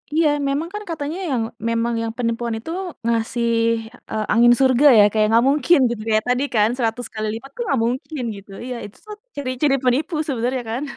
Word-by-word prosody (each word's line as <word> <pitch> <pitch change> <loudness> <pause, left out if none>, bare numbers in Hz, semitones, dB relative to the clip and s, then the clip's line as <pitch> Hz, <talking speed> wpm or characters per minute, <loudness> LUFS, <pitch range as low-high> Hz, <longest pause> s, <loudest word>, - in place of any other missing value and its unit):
iya 325 0 +4 0.2
memang 295 +5 -2
kan 420 0 -5
katanya 310 0 -4
yang 240 -4 0 0.3
memang 230 +1 0
yang 225 0 -2
penipuan 230 -1 -1
itu 280 +9 -7 0.3
ngasih, 235 +1 0 0.6
eee, 215 -1 -1
angin 240 +1 +6
surga 265 +1 +4
ya - - +8
kayak 215 0 +2
nggak 230 +2 +4
mungkin 295 +3 +4
gitu 220 -2 -5
ya 215 - +5
tadi 250 +2 +1
kan 210 0 +4
100 235 -1 -2
kali 215 -1 -3
lipat 255 +5 -8
tuh 485 - -5
nggak 275 - +1
mungkin 255 +3 -3
gitu, 200 0 -13
iya 250 0 -4
itu 205 - -13
tuh 425 0 -8 0.2
ciri-ciri 270 0 0
penipu 285 +7 +1
sebenarnya 250 -1 -1
kan. 245 +5 -2
245 Hz, 190 wpm, -21 LUFS, 230-280 Hz, 0.6 s, ya